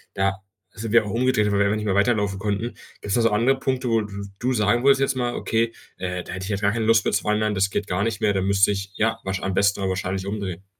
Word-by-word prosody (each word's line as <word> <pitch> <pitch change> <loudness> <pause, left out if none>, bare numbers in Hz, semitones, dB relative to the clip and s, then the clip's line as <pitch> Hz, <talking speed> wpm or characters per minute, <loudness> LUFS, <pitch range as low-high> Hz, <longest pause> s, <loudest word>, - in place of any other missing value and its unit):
da 95 0 0 0.4
sind 110 +1 -4
wir 115 -2 +5
auch - - -5
umgedreht, 115 -2 +2
weil 100 - +2
wir 100 - +4
einfach 105 +2 +1
nicht 105 - -4
mehr 100 -2 +1
weiterlaufen 100 -2 +1
konnten. 105 +3 -2 0.3
Gibt's 100 - -1
da 120 - +3
so 115 -1 +3
andere 120 +6 +2
Punkte, 130 -2 -1
wo 115 -1 +2
du 100 -1 -6 0.2
du 125 +2 0
sagen 110 +1 +2
würdest 135 0 +5
jetzt 135 0 +1
mal: 120 -1 -1
„Okay, 115 +1 0 0.3
äh, 90 -1 -3
da - - -8
hätte 95 +1 -5
ich 100 - -6
jetzt 100 - -1
gar 100 0 +2
keine 115 0 -1
Lust 110 -1 +4
mitzuwandern, 105 0 +1
das 95 +1 +2
geht 100 +1 -3
gar 90 +2 -1
nicht 110 -1 -1
mehr. 105 -3 +2
Da 95 - 0
müsste 100 +1 +3
ich, 100 -1 -4
ja, 110 +2 +1
wahrsch 95 0 -3
am 95 - -2
besten 100 +2 +2
aber 95 -1 -1
wahrscheinlich 95 +1 -3
umdrehen.“ 100 -3 -4
105 Hz, 270 wpm, -23 LUFS, 95-115 Hz, 0.4 s, wir